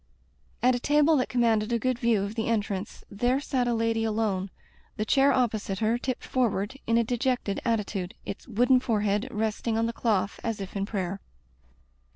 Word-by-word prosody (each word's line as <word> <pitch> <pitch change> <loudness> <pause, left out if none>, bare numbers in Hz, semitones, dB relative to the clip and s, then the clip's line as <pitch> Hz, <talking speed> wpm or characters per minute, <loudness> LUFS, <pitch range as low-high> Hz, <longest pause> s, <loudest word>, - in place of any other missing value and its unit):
At 255 +1 +5
a 245 - -1
table 295 +4 +4
that 255 - 0
commanded 230 -3 +2
a 235 - +2
good 255 +1 -1
view 230 -4 +2
of 200 +1 -4
the 225 -1 -2
entrance 205 -3 -2
there 245 +6 +1
sat 260 -3 -1
a 240 - +1
lady 225 0 +1
alone, 210 -3 -1 0.5
the 215 - -1
chair 275 +4 +4
opposite 220 -6 0
her 225 +3 +1
tipped 255 -1 -3
forward 225 -4 0
in 230 0 +3
a 235 - +4
dejected 245 -3 -1
at 230 -1 +2
titude, 195 -3 -4
its 200 - -7
wooden 250 +3 +4
forehead 210 -2 0
resting 220 0 -1
on 225 - +2
the 230 - -2
cloth 205 -4 0
as 225 -2 -2
if 195 0 -7
in 200 0 -1
prayer. 195 -2 -3
225 Hz, 190 wpm, -27 LUFS, 205-245 Hz, 0.5 s, At